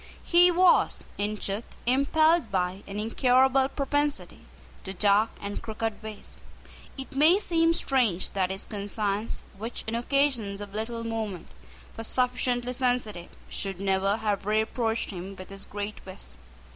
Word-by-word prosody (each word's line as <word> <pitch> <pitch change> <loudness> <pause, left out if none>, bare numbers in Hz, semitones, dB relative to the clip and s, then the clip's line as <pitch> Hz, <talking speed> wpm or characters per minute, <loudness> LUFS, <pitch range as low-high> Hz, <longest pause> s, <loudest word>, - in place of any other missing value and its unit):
He 350 +1 +6
was, 355 0 +4 0.2
in 210 +1 -1
truth, 205 +2 -3 0.2
impelled 285 +2 +3
by 185 0 -1
an 200 +1 -5
incurable 260 +4 +3
propensity 290 +1 -1 0.4
to 190 - -4
dark 205 +3 +4
and 205 0 -5
crooked 220 -1 -4
ways. 215 -1 -9 0.6
It 270 +1 -8
may 310 +7 +6
seem 330 -4 +2
strange 250 - +2
that 185 -2 0
his 195 0 -4
conscience, 205 +1 -3 0.2
which, 225 +3 -4
on 220 - -2
occasions 240 -5 +1
of 205 -1 -8
little 230 +2 -4
moment, 220 -6 -4 0.5
was 225 0 -1
sufficiently 250 -1 0
sensitive, 245 -8 -1 0.2
should 195 -2 -4
never 195 +1 +1
have 210 -3 -2
reproached 220 +2 0
him 190 +1 -7
with 185 0 -10
this 195 0 -9
great 205 +1 -5
vice. 190 +1 -8
220 Hz, 140 wpm, -27 LUFS, 200-260 Hz, 0.6 s, He